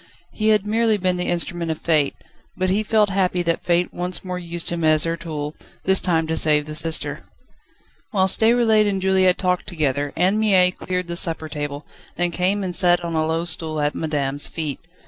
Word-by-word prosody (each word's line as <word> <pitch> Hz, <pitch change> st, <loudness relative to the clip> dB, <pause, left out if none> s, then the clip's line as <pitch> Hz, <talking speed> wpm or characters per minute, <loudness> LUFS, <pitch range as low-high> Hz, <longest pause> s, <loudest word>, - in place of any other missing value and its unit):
He 215 Hz, -, -2 dB
had 210 Hz, -2 st, +3 dB
merely 220 Hz, 0 st, +1 dB
been 185 Hz, -2 st, 0 dB
the 180 Hz, -, -2 dB
instrument 175 Hz, -1 st, -2 dB
of 160 Hz, -, -2 dB
Fate, 155 Hz, -4 st, +1 dB, 0.4 s
but 185 Hz, 0 st, 0 dB
he 205 Hz, +3 st, +1 dB
felt 215 Hz, -1 st, +2 dB
happy 185 Hz, -2 st, 0 dB
that 170 Hz, -1 st, -1 dB
Fate 175 Hz, 0 st, 0 dB
once 180 Hz, +2 st, -2 dB
more 180 Hz, -1 st, -4 dB
used 170 Hz, -1 st, -5 dB
him 170 Hz, -1 st, -3 dB
as 155 Hz, -1 st, +3 dB
her 165 Hz, 0 st, -1 dB
tool, 150 Hz, -3 st, -6 dB, 0.3 s
this 190 Hz, 0 st, +4 dB
time 165 Hz, -3 st, +1 dB
to 160 Hz, 0 st, -2 dB
save 150 Hz, -2 st, +3 dB
the 155 Hz, -, -7 dB
sister. 160 Hz, +1 st, -1 dB, 0.9 s
Whilst 190 Hz, -3 st, +2 dB
Déroulède 220 Hz, -2 st, +3 dB
and 195 Hz, -1 st, -1 dB
Juliette 190 Hz, -1 st, +2 dB
talked 180 Hz, -1 st, -1 dB
together 145 Hz, -4 st, -1 dB
Anne 185 Hz, +5 st, +2 dB
Mie 190 Hz, -4 st, +4 dB
cleared 180 Hz, 0 st, -4 dB
the 170 Hz, 0 st, -5 dB
supper 165 Hz, -3 st, 0 dB
table, 145 Hz, -1 st, -5 dB, 0.3 s
then 175 Hz, 0 st, 0 dB
came 190 Hz, +4 st, 0 dB
and 180 Hz, -2 st, -4 dB
sat 175 Hz, -1 st, +4 dB
on 170 Hz, -, -4 dB
a 155 Hz, -1 st, 0 dB
low 165 Hz, +1 st, -1 dB
stool 160 Hz, -2 st, +1 dB
at 145 Hz, 0 st, 0 dB
madame's 145 Hz, -3 st, -1 dB
feet. 155 Hz, -4 st, -4 dB
175 Hz, 200 wpm, -21 LUFS, 160-190 Hz, 0.9 s, this